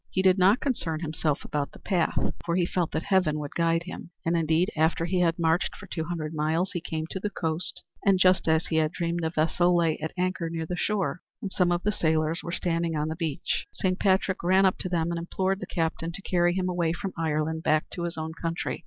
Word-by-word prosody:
He 190 Hz, -, 0 dB
did 190 Hz, 0 st, +5 dB
not 195 Hz, +7 st, +5 dB
concern 165 Hz, -, -1 dB
himself 155 Hz, -2 st, -1 dB
about 145 Hz, -2 st, -2 dB
the -, -, -11 dB
path, 180 Hz, -4 st, 0 dB, 0.3 s
for 170 Hz, -, -1 dB
he 180 Hz, -1 st, +3 dB
felt 175 Hz, -1 st, -1 dB
that 160 Hz, -, -1 dB
Heaven 185 Hz, -6 st, +2 dB
would 145 Hz, -1 st, -5 dB
guide 165 Hz, 0 st, +2 dB
him; 180 Hz, -1 st, -8 dB, 0.2 s
and 165 Hz, +1 st, +2 dB
indeed 165 Hz, +4 st, +2 dB
after 160 Hz, +1 st, +2 dB
he 180 Hz, +1 st, 0 dB
had 170 Hz, -2 st, +2 dB
marched 165 Hz, 0 st, +1 dB
for -, -, -11 dB
two 160 Hz, -2 st, -4 dB
hundred 160 Hz, -2 st, -4 dB
miles, 160 Hz, +5 st, 0 dB
he 175 Hz, -4 st, -3 dB
came 160 Hz, -2 st, -3 dB
to 190 Hz, -, -3 dB
the 210 Hz, -, -2 dB
coast, 165 Hz, -3 st, -2 dB, 0.2 s
and 195 Hz, -1 st, +4 dB
just 185 Hz, -1 st, +4 dB
as 160 Hz, 0 st, +3 dB
he 160 Hz, -, -1 dB
had 155 Hz, -1 st, +2 dB
dreamed 170 Hz, -1 st, -2 dB
a 160 Hz, -, +1 dB
vessel 175 Hz, +2 st, +2 dB
lay 165 Hz, -2 st, +2 dB
at 160 Hz, +1 st, -3 dB
anchor 180 Hz, -2 st, -1 dB
near 165 Hz, -1 st, -3 dB
the 180 Hz, -, -3 dB
shore 180 Hz, -6 st, -1 dB, 0.2 s
and 195 Hz, -, -5 dB
some 180 Hz, -2 st, +2 dB
of 175 Hz, 0 st, 0 dB
the 210 Hz, -, +2 dB
sailors 160 Hz, -2 st, +1 dB
were 170 Hz, -, -5 dB
standing 170 Hz, -1 st, 0 dB
on 150 Hz, +1 st, -1 dB
the 160 Hz, -, -3 dB
beach. 160 Hz, -4 st, -2 dB
Saint 185 Hz, 0 st, 0 dB
Patrick 190 Hz, -1 st, +2 dB
ran 190 Hz, +3 st, +4 dB
up 190 Hz, -, +2 dB
to 185 Hz, -, -3 dB
them 170 Hz, -1 st, 0 dB
and 170 Hz, -, -2 dB
implored 190 Hz, +3 st, -1 dB
the 190 Hz, -, -6 dB
captain 165 Hz, 0 st, -2 dB
to 195 Hz, -, -8 dB
carry 175 Hz, -2 st, +2 dB
him 185 Hz, -1 st, 0 dB
away 175 Hz, -2 st, 0 dB
from 190 Hz, +2 st, -4 dB
Ireland 160 Hz, 0 st, -1 dB
back 155 Hz, -1 st, +2 dB
to 175 Hz, -, -3 dB
his 170 Hz, -1 st, -4 dB
own 160 Hz, 0 st, -3 dB
country. 165 Hz, +1 st, -3 dB
170 Hz, 240 wpm, -27 LUFS, 160-185 Hz, 0.3 s, did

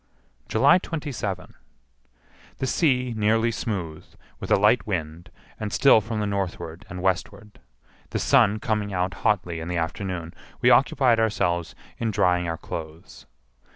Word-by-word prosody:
July -, -, +5 dB
27. 135 Hz, -, -5 dB, 1.0 s
The -, -, -2 dB
sea 125 Hz, -4 st, +1 dB
nearly 110 Hz, +2 st, +2 dB
smooth, 95 Hz, -8 st, -4 dB, 0.4 s
with -, -, -7 dB
a -, -, +6 dB
light 105 Hz, +4 st, +3 dB
wind, 85 Hz, -3 st, -4 dB, 0.3 s
and 105 Hz, -1 st, -4 dB
still 135 Hz, -3 st, +5 dB
from 110 Hz, +1 st, -4 dB
the 105 Hz, -, -1 dB
northward 90 Hz, -4 st, -4 dB
and 90 Hz, 0 st, -7 dB
westward. 95 Hz, +3 st, -2 dB, 0.5 s
The -, -, -2 dB
sun 105 Hz, +2 st, +3 dB
coming 105 Hz, -1 st, -2 dB
out 90 Hz, 0 st, -1 dB
hotly 90 Hz, -6 st, 0 dB
in 80 Hz, -, -6 dB
the 90 Hz, 0 st, -2 dB
afternoon, 85 Hz, 0 st, -4 dB, 0.3 s
we -, -, +4 dB
occupied 120 Hz, -4 st, +4 dB
ourselves 90 Hz, -6 st, 0 dB, 0.2 s
in 115 Hz, -, 0 dB
drying 90 Hz, -4 st, +1 dB
our 80 Hz, 0 st, -3 dB
clothes. 80 Hz, -1 st, -9 dB
100 Hz, 140 wpm, -24 LUFS, 85-110 Hz, 1.0 s, a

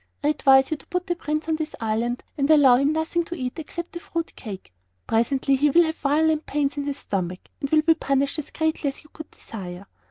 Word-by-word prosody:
I 295 Hz, -, +3 dB
advise 270 Hz, -2 st, +4 dB
you 315 Hz, -, 0 dB
to -, -, -19 dB
put 360 Hz, 0 st, -2 dB
the 350 Hz, -2 st, -1 dB
Prince 305 Hz, -1 st, -3 dB
on 320 Hz, -1 st, +1 dB
this 315 Hz, 0 st, -4 dB
island 230 Hz, +2 st, -1 dB
and 280 Hz, 0 st, 0 dB
allow 280 Hz, -5 st, +7 dB
him 275 Hz, +3 st, +2 dB
nothing 320 Hz, +2 st, 0 dB
to 345 Hz, -, -6 dB
eat 255 Hz, 0 st, -4 dB
except 340 Hz, +2 st, -6 dB
the 345 Hz, -, -6 dB
fruit 335 Hz, -1 st, -4 dB
cake. 195 Hz, -, -9 dB, 0.3 s
Presently 265 Hz, +4 st, +2 dB
he 295 Hz, +3 st, +3 dB
will 340 Hz, +5 st, +6 dB
have 320 Hz, -1 st, -2 dB
violent 310 Hz, +2 st, +1 dB
pains 285 Hz, -1 st, 0 dB
in 285 Hz, -1 st, -3 dB
his 285 Hz, -1 st, -2 dB
stomach 185 Hz, -5 st, -3 dB
and 280 Hz, -3 st, -3 dB
will 310 Hz, +1 st, +4 dB
be 325 Hz, +1 st, +5 dB
punished 275 Hz, -1 st, 0 dB
as 300 Hz, -, -6 dB
greatly 315 Hz, -2 st, -1 dB
as 275 Hz, -, -4 dB
you 305 Hz, -, -21 dB
could 315 Hz, -, -9 dB
desire." 185 Hz, -3 st, -9 dB
290 Hz, 230 wpm, -24 LUFS, 265-320 Hz, 0.3 s, allow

